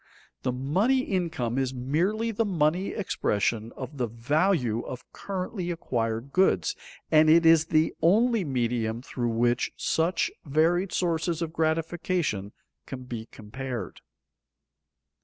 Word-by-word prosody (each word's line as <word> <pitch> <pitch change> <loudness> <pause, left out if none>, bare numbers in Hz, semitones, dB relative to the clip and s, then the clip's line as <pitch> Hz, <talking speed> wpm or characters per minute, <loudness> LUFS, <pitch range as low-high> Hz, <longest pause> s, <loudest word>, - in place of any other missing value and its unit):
The 125 - 0
money 185 - +1
income 165 - -1
is 130 -1 -1
merely 180 - 0
the 225 +1 0
money 175 -2 +1
expression 115 - -1
of 135 +2 -7
the 125 -2 0
value 125 - +1
of 125 0 -8
currently 185 -1 -4
acquired 120 -6 -2
goods, 185 - +2 0.4
and 155 0 +6
it 165 +1 +6
is 165 -1 +6
the 160 -1 +2
only 220 +5 +4
medium 120 -4 -1
through 120 -3 -2
which 120 +1 +1
such 170 +2 +1
varied 165 +6 +2
sources 170 -1 0
of 160 -1 -5
gratification 160 - -1 0.4
can 130 -1 -7
be 120 -3 -6
compared. 120 +4 -7
155 Hz, 120 wpm, -27 LUFS, 120-175 Hz, 0.4 s, and